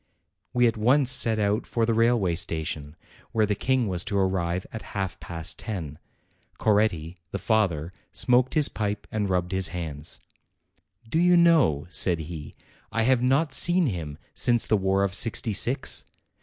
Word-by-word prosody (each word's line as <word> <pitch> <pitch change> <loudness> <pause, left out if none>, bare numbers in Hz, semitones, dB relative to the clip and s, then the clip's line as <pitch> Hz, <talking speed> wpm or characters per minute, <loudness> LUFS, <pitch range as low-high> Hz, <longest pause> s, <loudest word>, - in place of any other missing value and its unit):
We 125 0 +3
at 115 -1 +1
once 130 +4 +3
set 115 -3 +4
out 105 +2 0
for 115 -1 0
the 115 - +1
railway 115 -5 +2
station, 80 -3 -3 0.4
where 110 -1 +3
the 105 - 0
King 130 +3 0
was 90 -2 -1
to 105 -4 -2
arrive 95 -2 -1
at 110 - -6 0.2
half 95 -2 -3
past 85 -1 -5
ten. 85 -10 -6 0.6
Coretti, 100 -6 +1
the - - -4
fa 110 -2 +2
ther, 80 +2 -7 0.2
smoked 125 +2 +1
his 150 -2 +5
pipe 105 -1 -4
and 105 -2 -1
rubbed 90 -1 -1
his 95 -2 0
hands. 80 -3 -6 0.9
"Do 160 - 0
you 175 0 +5
know," 155 - +4
said 90 -2 +1
he, 80 -1 -8 0.4
"I 115 - 0
have 125 +1 +3
not 135 +4 +1
seen 175 +4 +4
him 80 - -4 0.2
since 120 -2 +3
the 110 - +2
war 95 0 +1
of 100 -1 -1
'sixty 110 +1 +1
six? 125 +6 +1
105 Hz, 170 wpm, -25 LUFS, 85-120 Hz, 0.9 s, his